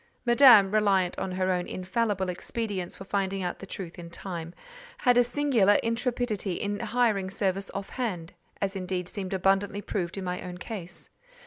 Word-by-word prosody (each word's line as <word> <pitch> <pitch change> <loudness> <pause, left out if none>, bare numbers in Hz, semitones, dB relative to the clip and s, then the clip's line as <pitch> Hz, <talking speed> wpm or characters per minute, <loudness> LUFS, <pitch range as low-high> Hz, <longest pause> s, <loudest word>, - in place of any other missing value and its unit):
Madame—reliant 210 -7 +6
on 190 - -3
her 185 0 0
own 180 -1 -1
infallible 190 +1 -1
expedients 190 0 -3
for - - -9
finding 195 -1 -1
out 180 - -3
the 195 - -9
truth 180 -3 -7
in 170 -1 -8
time—had 245 - -3
a 245 - +6
singular 240 -6 +3
intrepidity 230 -4 -1
in 205 +3 -2
hiring 220 -6 +1
service 195 0 -1
off 195 0 -4
hand 185 -9 -3 0.3
(as 195 0 -1
indeed 185 -1 -3
seemed 190 -1 -5
abundantly 195 +2 +1
proved 185 -3 -3
in 195 - -3
my 180 0 -3
own 180 -1 -7
case). 180 -4 -7
195 Hz, 155 wpm, -28 LUFS, 185-225 Hz, 0.3 s, Madame—reliant